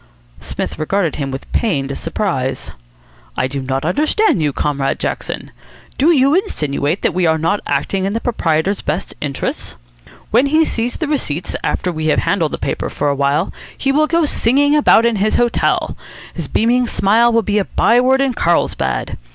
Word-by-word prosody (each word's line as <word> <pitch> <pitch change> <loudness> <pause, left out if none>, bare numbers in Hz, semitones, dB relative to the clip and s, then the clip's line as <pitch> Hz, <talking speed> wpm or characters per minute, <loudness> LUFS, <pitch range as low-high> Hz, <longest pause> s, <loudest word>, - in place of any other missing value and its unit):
Psmith - - -5
regarded 170 +2 0
him 140 -2 -3
with 135 +1 -7
pained 140 - -1
surprise. 165 -7 -3 0.7
"I - - +1
do 140 +1 -4
not 135 +2 -2
understand 305 - +2
you, 150 -2 +1
Comrade 140 -1 -1
Jackson. - - -4 0.5
Do 290 +5 +4
you 280 -3 +4
insinuate 155 - -1
that - - +1
we 180 -2 +1
are 160 0 +3
not 165 +6 0
acting 190 -1 -1
in 200 - -1
the 225 - -1
proprietor's 190 -5 0
best 170 +6 -3
interests? 140 -2 -4 0.6
When 245 +5 +4
he 315 +3 +3
sees 240 -2 -2
the 320 - -3
receipts, 180 - -2
after 180 - -1
we 155 -1 -3
have 155 - +2
handled 170 -6 0
the - - -2
paper - - -3
for 145 - -1
a 140 - 0
while, 140 +5 0 0.2
he 270 - 0
will 305 +2 +3
go 335 0 +2
singing 285 +2 +2
about 260 -6 +5
his 215 -2 +1
hotel. 240 0 +1 0.4
His - - -5
beaming 245 +2 +2
smile 225 +4 +3
will 230 -1 +2
be 210 +1 +1
a 195 - 0
by 240 +2 +3
word 265 +1 +3
in 270 -2 +1
Carlsbad. 165 - 0
200 Hz, 175 wpm, -17 LUFS, 150-250 Hz, 0.7 s, about